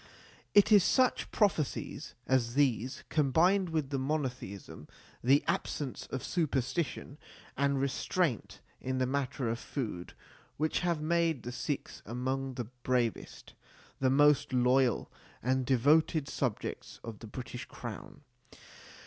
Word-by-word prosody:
It 205 Hz, +1 st, +6 dB
is 205 Hz, -4 st, +8 dB
such 255 Hz, +4 st, +2 dB
prophecies 160 Hz, -, -1 dB
as 125 Hz, -2 st, +1 dB
these, 130 Hz, -2 st, +1 dB
combined 170 Hz, +6 st, +3 dB
with 155 Hz, -4 st, -1 dB
the 135 Hz, -, 0 dB
monotheism, 125 Hz, -, -4 dB, 0.4 s
the 135 Hz, +4 st, +5 dB
absence 140 Hz, -4 st, -2 dB
of 135 Hz, -, -4 dB
superstition 145 Hz, -2 st, -1 dB, 0.4 s
and 140 Hz, -1 st, +1 dB
restraint 140 Hz, -, -1 dB, 0.2 s
in 130 Hz, 0 st, -2 dB
the 130 Hz, -, +2 dB
matter 135 Hz, -1 st, -1 dB
of 115 Hz, +1 st, -1 dB
food, 110 Hz, -12 st, -5 dB, 0.4 s
which 155 Hz, +1 st, +1 dB
have 170 Hz, -3 st, 0 dB
made 165 Hz, -4 st, +1 dB
the 120 Hz, -, -5 dB
Sikhs 140 Hz, +3 st, -4 dB
among 130 Hz, +3 st, -3 dB
the 120 Hz, -, -3 dB, 0.2 s
bravest, 120 Hz, -3 st, -1 dB, 0.5 s
the 130 Hz, -, +3 dB
most 145 Hz, 0 st, +4 dB
loyal 125 Hz, -1 st, +3 dB, 0.3 s
and 130 Hz, +1 st, +1 dB
devoted 145 Hz, +4 st, +3 dB
subjects 125 Hz, -7 st, -3 dB
of 115 Hz, -3 st, -7 dB
the 115 Hz, -, -9 dB
British 125 Hz, +2 st, -7 dB
Crown. -, -, -8 dB
135 Hz, 125 wpm, -31 LUFS, 125-155 Hz, 0.5 s, is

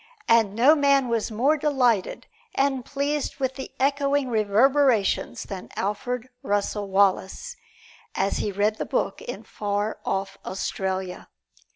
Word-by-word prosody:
And 220 Hz, -3 st, +4 dB
no 255 Hz, +7 st, +6 dB
man 280 Hz, -4 st, +3 dB
was 230 Hz, -2 st, 0 dB
more 260 Hz, +8 st, +2 dB
delighted 255 Hz, -9 st, +1 dB, 0.3 s
and 270 Hz, -2 st, +1 dB
pleased 285 Hz, +2 st, -2 dB
with 265 Hz, -2 st, -1 dB
the 265 Hz, 0 st, -7 dB
echoing 280 Hz, 0 st, +1 dB
reverberations 230 Hz, +2 st, +2 dB
than 190 Hz, -2 st, -8 dB
Alfred 245 Hz, +5 st, -2 dB
Russel 205 Hz, 0 st, -1 dB
Wallace, 195 Hz, -, +1 dB, 0.6 s
as 195 Hz, +1 st, 0 dB
he 205 Hz, -, -1 dB
read 205 Hz, +2 st, +1 dB
the -, -, -2 dB
book -, -, -1 dB
in 485 Hz, -, -7 dB
far 205 Hz, +1 st, -3 dB
off 195 Hz, 0 st, -3 dB
Australia. 190 Hz, 0 st, -4 dB
230 Hz, 130 wpm, -25 LUFS, 200-275 Hz, 0.6 s, no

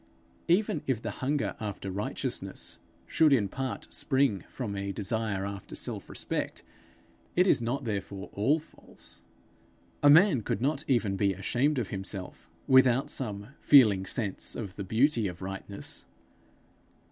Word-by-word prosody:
Even 175 Hz, -3 st, +2 dB
if 130 Hz, -5 st, +1 dB
the 110 Hz, -2 st, -4 dB
hunger 140 Hz, +7 st, -1 dB
after 100 Hz, -2 st, -5 dB
righteousness 100 Hz, +3 st, -4 dB, 0.3 s
should 155 Hz, -2 st, +3 dB
in 115 Hz, -7 st, +4 dB
part 130 Hz, 0 st, -5 dB
spring 130 Hz, -, +1 dB
from 110 Hz, -6 st, -4 dB
a 100 Hz, 0 st, -3 dB
desire 100 Hz, 0 st, -1 dB
after 100 Hz, -1 st, -7 dB
self -, -, -3 dB
respect, -, -, -3 dB, 0.7 s
it 180 Hz, -, +5 dB
is 180 Hz, -, +4 dB
not 120 Hz, +4 st, -2 dB
therefore 100 Hz, -3 st, -4 dB
all 120 Hz, +10 st, +2 dB
false. 160 Hz, +1 st, -12 dB, 0.8 s
A 145 Hz, -, +6 dB
man 160 Hz, -, +6 dB
could 100 Hz, -, -2 dB
not 140 Hz, +4 st, 0 dB
even 110 Hz, -7 st, +1 dB
be 100 Hz, 0 st, +2 dB
ashamed 125 Hz, -, 0 dB
of 120 Hz, -5 st, -1 dB
himself, 95 Hz, -1 st, -5 dB, 0.2 s
without 130 Hz, 0 st, +5 dB
some 105 Hz, -4 st, -3 dB
'feeling 105 Hz, -9 st, +6 dB
sense' 100 Hz, -3 st, -1 dB
of 100 Hz, -6 st, -6 dB
the 100 Hz, -, -5 dB
beauty 115 Hz, +3 st, +2 dB
of 90 Hz, -2 st, -7 dB
rightness. 95 Hz, +1 st, -5 dB
110 Hz, 140 wpm, -29 LUFS, 100-135 Hz, 0.8 s, A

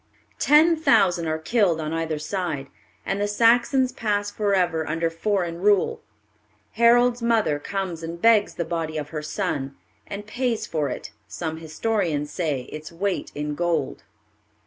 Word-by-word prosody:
Ten 315 Hz, +3 st, +5 dB
thousand 185 Hz, -, +3 dB
are 155 Hz, 0 st, 0 dB
killed 175 Hz, 0 st, +1 dB
on 155 Hz, 0 st, -3 dB
either 165 Hz, -1 st, -2 dB
side, 155 Hz, -2 st, -3 dB, 0.4 s
and 195 Hz, +1 st, -1 dB
the 205 Hz, -, +1 dB
Saxons 240 Hz, +4 st, +3 dB
pass 205 Hz, -4 st, -1 dB
forever 180 Hz, -7 st, 0 dB
under 165 Hz, +1 st, 0 dB
foreign 170 Hz, -1 st, -1 dB
rule. 200 Hz, 0 st, +2 dB, 0.7 s
Harold's 240 Hz, +1 st, +4 dB
mother 225 Hz, -11 st, +2 dB
comes 185 Hz, -1 st, -4 dB
and 165 Hz, +1 st, -6 dB
begs 220 Hz, 0 st, +4 dB
the 170 Hz, -, -2 dB
body 160 Hz, -2 st, -3 dB
of 150 Hz, -1 st, -4 dB
her 155 Hz, -1 st, -4 dB
son, 150 Hz, -4 st, -3 dB, 0.3 s
and 205 Hz, +1 st, -6 dB
pays 240 Hz, +1 st, -1 dB
for 150 Hz, -3 st, -1 dB
it, -, -, -6 dB, 0.2 s
some 160 Hz, -2 st, -4 dB
historians 160 Hz, -2 st, -2 dB
say, 150 Hz, -5 st, -1 dB
its 155 Hz, +5 st, -9 dB
weight 190 Hz, +3 st, -2 dB
in 150 Hz, 0 st, -3 dB
gold. 165 Hz, -3 st, -1 dB
175 Hz, 145 wpm, -24 LUFS, 155-215 Hz, 0.7 s, Ten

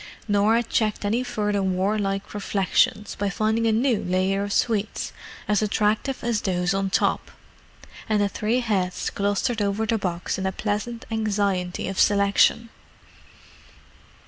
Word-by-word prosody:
Norah 210 Hz, +3 st, +3 dB
checked 215 Hz, -2 st, -1 dB
any 225 Hz, +4 st, +1 dB
further 210 Hz, -5 st, -1 dB
warlike 195 Hz, +1 st, -1 dB
reflections 205 Hz, +2 st, +1 dB
by 205 Hz, 0 st, -2 dB
finding 220 Hz, +4 st, 0 dB
a -, -, +3 dB
new 230 Hz, 0 st, +1 dB
layer 185 Hz, +2 st, +1 dB
of 200 Hz, 0 st, -3 dB
sweets 215 Hz, -1 st, -1 dB, 0.3 s
as 210 Hz, -1 st, +2 dB
attractive 215 Hz, +5 st, 0 dB
as 235 Hz, -3 st, 0 dB
those 180 Hz, -1 st, 0 dB
on 195 Hz, 0 st, 0 dB
top, -, -, 0 dB, 0.8 s
and 215 Hz, -1 st, +2 dB
the 205 Hz, -, +3 dB
three 220 Hz, +5 st, -1 dB
heads 190 Hz, -6 st, -1 dB
clustered 205 Hz, +3 st, 0 dB
over 205 Hz, +2 st, 0 dB
the 225 Hz, 0 st, 0 dB
box 180 Hz, -1 st, -2 dB
in 190 Hz, -, -1 dB
a -, -, 0 dB
pleasant 215 Hz, +4 st, -3 dB
anxiety 200 Hz, -5 st, -1 dB
of 195 Hz, 0 st, -4 dB
selection. 200 Hz, +3 st, +3 dB
205 Hz, 140 wpm, -24 LUFS, 195-220 Hz, 0.8 s, Norah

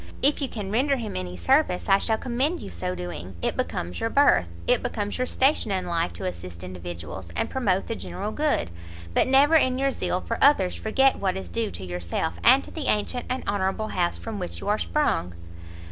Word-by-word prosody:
If 290 Hz, +2 st, +4 dB
you 275 Hz, -, -1 dB
can 205 Hz, -4 st, -5 dB
render 270 Hz, +6 st, +2 dB
him 230 Hz, -5 st, -5 dB
any 90 Hz, -1 st, -4 dB
service, 265 Hz, -, +2 dB
I 195 Hz, 0 st, +5 dB
shall 220 Hz, +1 st, +1 dB
commend 265 Hz, +9 st, -1 dB
your -, -, -8 dB
so 180 Hz, 0 st, -3 dB
doing; 175 Hz, -, -6 dB
it -, -, 0 dB
becomes 90 Hz, +1 st, -3 dB
your 225 Hz, -, 0 dB
birth, 275 Hz, -, +4 dB, 0.2 s
it -, -, +3 dB
becomes 205 Hz, +2 st, -3 dB
your 255 Hz, -, 0 dB
station 265 Hz, -3 st, +2 dB
in 190 Hz, -2 st, -1 dB
life 170 Hz, -, 0 dB
to 85 Hz, -, -6 dB
assist 85 Hz, -1 st, -6 dB
individuals, 90 Hz, -1 st, -7 dB
and -, -, -1 dB
promote 195 Hz, -8 st, +1 dB
the -, -, -3 dB
general 210 Hz, -1 st, -5 dB
good: 295 Hz, -, 0 dB, 0.4 s
but -, -, +3 dB
never 275 Hz, +4 st, +5 dB
in 260 Hz, -5 st, +4 dB
your 275 Hz, +1 st, +1 dB
zeal 180 Hz, -6 st, -1 dB
for 230 Hz, +4 st, -4 dB
others 235 Hz, -11 st, +5 dB
forget 265 Hz, +5 st, +2 dB
what 190 Hz, -1 st, 0 dB
is 190 Hz, -, -6 dB
due 230 Hz, -2 st, -1 dB
to 95 Hz, -, -7 dB
yourself, 90 Hz, -, -3 dB
and 260 Hz, +3 st, +7 dB
to -, -, -9 dB
the 310 Hz, -4 st, -4 dB
ancient 215 Hz, +4 st, 0 dB
and 255 Hz, +1 st, -2 dB
honourable 200 Hz, +2 st, -1 dB
house 175 Hz, -2 st, 0 dB
from 220 Hz, -2 st, -6 dB
which 180 Hz, -, -5 dB
you -, -, -7 dB
are 210 Hz, -, +2 dB
sprung." 90 Hz, -, 0 dB
205 Hz, 210 wpm, -25 LUFS, 160-260 Hz, 0.4 s, and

